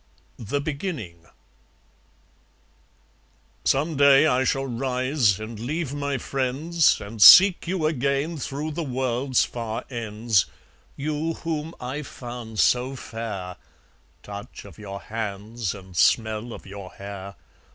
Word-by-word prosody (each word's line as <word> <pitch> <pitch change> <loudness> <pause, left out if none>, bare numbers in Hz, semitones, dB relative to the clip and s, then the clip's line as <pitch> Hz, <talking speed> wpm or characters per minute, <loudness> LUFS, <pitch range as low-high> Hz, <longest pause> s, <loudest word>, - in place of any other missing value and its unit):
The 120 +6 -2
Beginning 140 - -5 2.4
Some 150 +3 +1
day 140 +1 +7
I 130 -4 +3
shall 135 0 0
rise 125 -3 +1
and 110 0 -7
leave 145 +4 -3
my 140 -1 -2
friends 135 +6 +1
And 105 +1 -8
seek 185 - +9
you 180 -3 -1
again 140 +2 0
through 145 +4 -4
the 165 +3 -3
world's 130 -1 0
far 115 -2 -5
ends, 110 -4 0 0.5
You 155 +3 -2
whom 160 0 -4
I 130 +4 -4
found 120 -5 -8
so 125 +5 +2
fair 110 -7 -6 0.7
(Touch 100 0 -9
of 100 -2 -13
your 100 -1 -7
hands 110 0 -4
and 95 -2 -12
smell 110 +4 +2
of - - -9
your 95 -1 -9
hair!) 100 0 -8
125 Hz, 120 wpm, -24 LUFS, 110-145 Hz, 2.4 s, seek